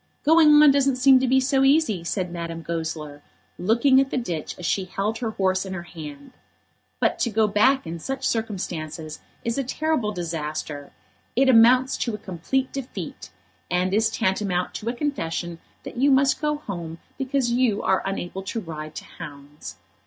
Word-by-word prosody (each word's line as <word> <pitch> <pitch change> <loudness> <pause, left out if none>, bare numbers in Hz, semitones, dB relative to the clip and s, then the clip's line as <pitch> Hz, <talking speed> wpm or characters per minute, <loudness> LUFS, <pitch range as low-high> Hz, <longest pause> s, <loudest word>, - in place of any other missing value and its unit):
"Going 305 -1 +6
on 295 - +8
doesn't 275 -1 +2
seem 260 +1 +6
to 260 - 0
be 265 +1 +4
so 270 +1 +2
easy," 270 - +3
said 180 0 -2
Madame 165 -1 -5
Goesler, 160 -3 -4 0.4
looking 240 +7 +4
at 270 - -1
the - - -2
ditch 175 -11 -4
as 180 - -7
she 190 +2 0
held 205 +4 -2
her 235 -3 -2
horse 190 -3 0
in 190 -1 -6
her 175 - -5
hand. 150 -5 -10 0.7
But - - +1
to 235 - +1
go 220 0 +2
back 255 +6 +3
in 165 +1 -5
such 270 +8 -3
circumstances 165 -8 -4 0.3
is 235 +3 -1
a - - 0
terrible 265 -4 -1
disaster. 155 -5 -5 0.4
It 265 +1 +4
amounts 255 +2 +5
to 230 -4 -2
complete 205 +8 -2
defeat; 270 -2 -6 0.4
and 180 +1 0
is 220 +2 +3
tantamount 190 -4 -1
to 215 +5 -4
a - - -1
confession 175 - -3 0.2
that - - -9
you 275 +3 +4
must 275 +1 +3
go 300 -1 +1
home, 175 - -6 0.2
because 265 -2 0
you 240 -4 +1
are 190 - +2
unable 190 -1 -4
to 195 +4 -4
ride 155 -5 -7
to - - -7
hounds. 140 - -10
210 Hz, 175 wpm, -24 LUFS, 170-260 Hz, 0.7 s, on